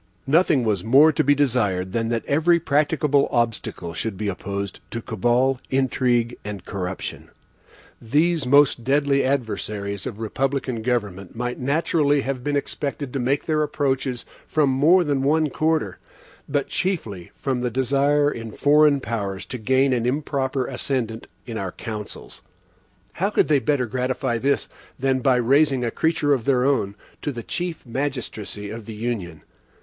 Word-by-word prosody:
Nothing 150 -2 +3
was 105 -5 0
more 140 +7 +6
to - - +1
be 145 +1 +4
desired 105 -10 +1
than 115 +2 -1
that 115 -1 -1
every 160 +4 +3
practicable 145 -1 +2
obstacle 115 -8 -1
should 100 +4 -3
be 105 0 -2
opposed 100 0 -4
to 115 - -4
cabal, 120 +4 +1
intrigue, 125 -3 +1
and 100 -3 -7
corruption. 95 -1 -5 0.7
These 150 +5 +1
most 140 -2 +4
deadly 140 +1 +2
adversaries 105 -6 -2
of - - -6
republican 130 +2 -2
government 105 -6 -2
might 125 +1 -3
naturally 145 +1 +2
have 130 -2 -3
been 145 +1 -1
expected 140 -1 -3
to 135 - -1
make 130 +3 0
their 155 -1 +1
approaches 135 -4 -1 0.2
from 150 -3 +2
more 160 +8 +5
than 145 -4 0
one 150 +2 +2
quarter, 155 - 0 0.5
but 140 -1 0
chiefly 110 - -3
from 130 -3 -2
the 125 - 0
desire 140 +4 +2
in 115 -4 -6
foreign 145 +2 +4
powers 100 -5 -3
to 125 - -6
gain 130 +4 +2
an 120 -1 0
improper 135 -1 -1
ascendant 115 -5 -3 0.2
in 115 -3 -5
our 95 -2 -4
councils. 105 -2 -7 0.7
How 195 +4 0
could 210 - +2
they 145 -2 +4
better 140 -2 +1
gratify 125 0 -1
this, 140 +4 +1 0.3
than 130 0 +1
by 130 0 +3
raising 135 +1 +3
a 115 - -1
creature 160 -3 +1
of 125 -5 -1
their 130 -2 +3
own 115 -8 +1 0.3
to 145 - -2
the 120 -3 -7
chief 175 +4 -4
magistracy 115 -6 -4
of 110 -1 -8
the 110 - -7
Union? 105 -9 -4
130 Hz, 155 wpm, -23 LUFS, 115-145 Hz, 0.7 s, more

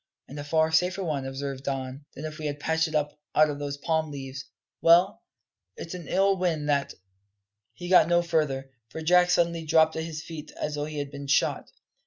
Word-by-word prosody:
"And 145 - -8
a - - -4
far 160 +2 +2
safer 180 +4 +2
one," 145 -6 -2
observed 135 0 -5
Don, 135 +1 -4
"than 150 - -6
if 155 0 -7
we 155 - -3
had 145 0 -4
patched 160 +2 +1
it 155 - -6
up 150 0 -1 0.2
out 155 0 +5
of 145 - -6
those 145 -1 -4
palm 160 +1 -1
leaves. 135 -2 -7 0.4
Well, 175 +4 +5 0.6
it's 165 - -7
an 180 -3 -8
ill 195 +1 +2
wind 165 -5 -1
that 140 -2 0 0.4
" 100 - -53 0.3
He 175 - -7
got 180 -3 +6
no 175 0 +3
further, 145 -6 -1 0.2
for 160 - -7
Jack 180 +2 +5
suddenly 170 -1 +2
dropped 160 0 +3
at 160 - -2
his 160 -1 -6
feet 160 -2 -8
as 150 - -2
though 145 0 -2
he 155 0 -7
had 145 -1 -4
been 140 -1 -7
shot. 140 - +1
155 Hz, 215 wpm, -27 LUFS, 145-165 Hz, 0.6 s, got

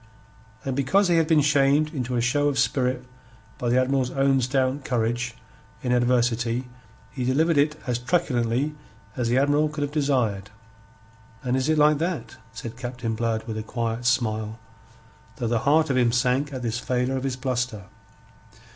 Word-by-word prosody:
And 135 -1 -2
because 180 +9 +2
he 170 - +4
had 165 -1 +3
been 160 -2 +4
shamed 145 +1 +3
into 125 -3 -3
a 120 - +1
show 145 +5 +2
of 140 -2 0
spirit 125 -2 0 0.5
by 120 - -1
the 125 +2 +4
Admiral's 130 0 +1
own 135 -1 +2
stout 130 +2 0
courage 120 -1 -1 0.5
in 125 - 0
adversity, 120 0 +1 0.4
he 130 - -4
delivered 155 +6 +2
it 145 +1 +3
as 125 -1 -1
truculently 125 -1 0 0.4
as 120 -2 -1
the 120 - +2
Admiral 145 +2 +3
could 150 -1 -3
have 145 - -3
desired. 125 -10 0 0.9
"And 125 0 0
is 130 +3 0
it 155 - +3
like 150 0 +4
that?" 160 -9 -3
said 115 0 -8
Captain 120 -2 -4
Blood 110 0 -1
with 110 -1 -4
a - - -3
quiet 115 +1 -3
smile, 110 -3 0 0.8
though - - -4
the 115 0 +1
heart 155 0 +4
of 130 - +1
him 120 -2 +3
sank 125 +4 +1
at 130 -2 -5
this 120 +1 -1
failure 125 +1 -1
of 130 - -3
his 135 -2 -1
bluster. 125 -4 -2
125 Hz, 175 wpm, -25 LUFS, 120-140 Hz, 0.9 s, he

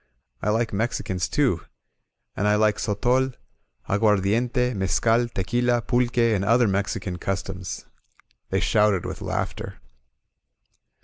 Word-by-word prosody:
I 105 - 0
like 115 +1 0
Mexicans 100 -4 -1
too. - - +1 0.7
And 105 - 0
I 105 - +4
like 105 0 +3
sotol^ 125 +5 +1 0.5
aguardiente^ 110 +5 +2
mescal, 115 +5 +2
tequila, 120 +4 0
pulque, 120 -1 0 0.2
and 100 -2 0
other 115 +3 +4
Mexican 100 -1 -2
customs 95 -2 -4 0.3
!" - - -36
They 95 +1 0
shouted 105 -2 +2
with - - -6
laughter. - - -4
105 Hz, 115 wpm, -24 LUFS, 95-120 Hz, 0.7 s, I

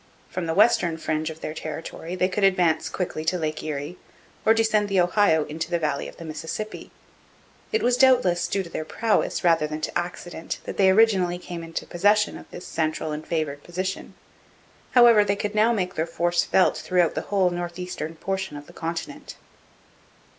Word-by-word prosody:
From 180 -2 -3
the 160 - -1
western 185 -6 +4
fringe 155 0 -2
of 160 0 -9
their 155 - -4
territory 160 +2 -6
they 185 0 +2
could 195 +2 -2
advance 180 -5 +3
quickly 175 -4 -3
to 180 +3 +1
Lake 155 -2 -3
Erie, 150 +2 -5 0.4
or 220 - +4
descend 215 -2 +2
the 195 -1 +2
Ohio 175 -3 +3
into 160 +2 -5
the 175 - +1
valley 150 -4 -2
of - - -12
the 165 - -9
Mississippi. 160 +7 -6 0.8
It 440 -1 +1
was 245 0 +3
doubtless 250 -10 +4
due 195 - -1
to 170 - -10
their - - -3
prowess 220 +6 0
rather 165 -3 +3
than 155 0 -5
to - - -4
accident 175 -1 -4
that - - -7
they 190 -1 +5
originally 190 -4 +4
came 175 -1 -7
into 165 0 -5
possession 205 +4 +2
of - - -11
this 175 - -9
central 155 -1 -2
and 150 +1 -6
favoured 150 -3 -2
position; 185 +2 -4 0.8
however, 235 -4 +7
they 200 0 0
could 205 +1 -3
now 215 +2 +4
make 185 -6 -1
their 160 +1 -1
force 175 +1 +1
felt 190 - +3
throughout 180 -3 +1
the - - -2
whole 190 -3 +2
north 175 0 -4
eastern 180 -3 -5
portion 190 -1 -3
of 145 - -10
the - - -16
continent. 165 0 -5
175 Hz, 190 wpm, -24 LUFS, 160-195 Hz, 0.8 s, however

